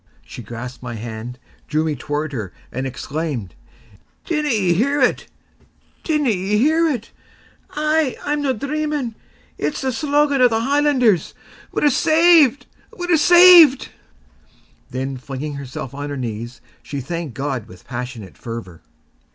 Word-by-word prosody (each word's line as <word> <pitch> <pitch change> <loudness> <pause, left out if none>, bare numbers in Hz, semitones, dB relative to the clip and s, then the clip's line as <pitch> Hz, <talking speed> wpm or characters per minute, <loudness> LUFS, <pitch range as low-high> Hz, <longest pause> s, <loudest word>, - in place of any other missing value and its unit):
She - - -9
grasped 120 +3 -8
my 120 -2 -6
hand, 115 +2 -7 0.3
drew 155 +1 0
me 155 -2 -1
toward 145 +3 -4
her, 105 -8 -5 0.2
and 130 +2 -3
exclaimed: 135 - -4 0.7
"Dinna 300 -3 -1
ye 200 -8 +2
hear 280 +11 +1
it? 250 - +1 0.8
dinna 300 -6 +1
ye 195 +1 0
hear 315 +7 +3
it? 245 -7 -3 0.6
Aye. 305 -2 0
I'm 295 0 0
no 280 -2 +1
dreaming: 285 0 -2 0.5
it's 300 - -2
the 265 -1 -1
slogan 285 +1 +1
o' 250 - +8
the 225 -1 0
Highlanders! 265 - +2 0.4
We're 295 - +2
saved! 315 -2 +4 0.3
we're 355 -1 0
saved!" 345 -4 +7 1.0
Then, 130 +1 -4
flinging 135 +3 -6
herself 135 -2 -7
on 145 +1 -5
her 145 - -4
knees, 120 0 -6 0.2
she 140 - -6
thanked 160 0 -5
God 135 -5 -3
with 90 -3 -15
passionate 125 -5 -7
fervour. 115 -8 -8
180 Hz, 135 wpm, -20 LUFS, -, 1.0 s, o